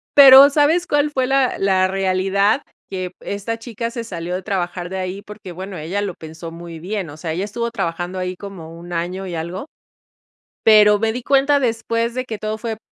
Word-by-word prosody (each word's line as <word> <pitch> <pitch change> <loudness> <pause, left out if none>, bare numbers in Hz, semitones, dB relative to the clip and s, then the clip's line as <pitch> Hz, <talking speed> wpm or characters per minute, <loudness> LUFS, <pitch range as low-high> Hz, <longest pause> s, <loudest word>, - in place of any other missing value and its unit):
pero, 275 0 +10
¿sabes 310 +5 +2
cuál 295 0 +1
fue 260 -2 0
la 270 -1 +2
la 190 -1 +3
realidad?, 195 +5 +1 0.3
que 185 -2 -4
esta 205 +3 -4
chica 230 0 -5
se 235 -1 -5
salió 175 -3 -5
de 185 - -2
trabajar 180 -3 -3
de 190 - -4
ahí 185 +1 -4
porque, 210 -3 -10
bueno, 190 +2 -7
ella 170 +6 -3
lo 200 -3 -3
pensó 160 +1 -9
muy 170 -1 -9
bien. 190 0 -4
O 145 - -10
sea, 160 0 -4
ella 180 +4 -2
estuvo 235 +3 -3
trabajando 175 -4 -3
ahí 180 0 -3
como 180 -5 -9
1, 175 0 -9
año 180 +3 -3
y 175 - -5
algo. 170 +7 -5 1.0
Pero 210 -1 +7
me 220 +1 0
di 245 +1 -5
cuenta 280 +1 +3
después 230 -1 -1
de 255 +1 -2
que 225 -4 -6
todo 215 +1 -3
fue 225 0 -4
200 Hz, 200 wpm, -20 LUFS, 180-230 Hz, 1.0 s, pero